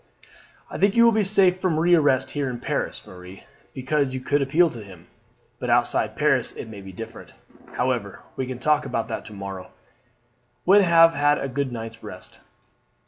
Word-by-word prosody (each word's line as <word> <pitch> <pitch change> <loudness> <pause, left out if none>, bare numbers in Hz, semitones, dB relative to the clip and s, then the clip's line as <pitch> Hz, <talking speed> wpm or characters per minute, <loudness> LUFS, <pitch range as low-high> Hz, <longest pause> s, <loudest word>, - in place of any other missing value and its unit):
"I - - -6
think 200 0 +2
you 235 - +6
will 230 - +6
be 215 -1 +1
safe 190 -2 +3
from 180 -4 -1
re 175 +2 +3
arrest 145 -6 +2
here 145 -2 -2
in 120 -1 -6
Paris, - - -4
Marie, 90 +1 -13 0.3
because 130 0 -1
you - - -3
could 145 +3 0
appeal 155 +6 +3
to 115 -3 -9
him; 90 -4 -14 0.5
but - - -4
outside - - +2
Paris - - +2
it 110 - -9
might 100 -2 -10
be 95 - -9
different. 115 - -10 0.4
However, - - -2
we 130 - -3
can 130 -1 -5
talk 150 +3 +1
about 115 -1 -3
that - - -5
to 110 - -10
morrow, 100 -2 -8 1.0
when 195 +3 +6
you 190 - +1
have 165 0 +6
had 145 0 +2
a 135 - -3
good 135 0 -3
night's 115 -1 -7
rest." - - -11
135 Hz, 195 wpm, -23 LUFS, 115-165 Hz, 1.0 s, you